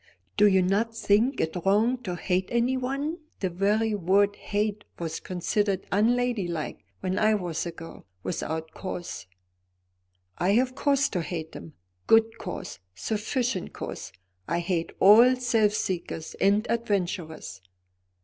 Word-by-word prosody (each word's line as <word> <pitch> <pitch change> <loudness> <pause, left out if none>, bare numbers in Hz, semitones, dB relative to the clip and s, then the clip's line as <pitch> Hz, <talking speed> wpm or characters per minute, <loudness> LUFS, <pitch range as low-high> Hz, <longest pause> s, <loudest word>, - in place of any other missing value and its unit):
"Do 210 - +6
you 190 -2 +4
not 220 +5 0
think 230 +6 +2
it 160 - -1
wrong 220 +6 +3
to 180 -2 -2
hate 185 +1 -1
anyone 260 +6 0 0.2
the 185 -2 -1
very 210 +5 +1
word 200 +1 +2
hate 210 0 -2
was 165 -2 -4
considered 195 +2 -1
unladylike 210 -6 0 0.2
when 185 0 -1
I 215 0 +4
was 175 -4 -3
a - - -3
girl 165 - -11 0.2
without 160 -1 -3
cause?" 175 - -6 1.1
"I 185 +3 +3
have 255 +3 +2
cause 280 +1 +2
to 180 - -1
hate 160 0 -5
him, 160 - -10 0.3
good 225 0 +4
cause, - - -6 0.2
sufficient 220 - -2
cause. - - -6 0.4
I 170 +2 0
hate 170 -2 -1
all 230 +6 +8
self 230 -4 +2
seekers 170 -5 -3
and 205 +3 +3
adventurers." 180 - -2
205 Hz, 130 wpm, -27 LUFS, 175-225 Hz, 1.1 s, all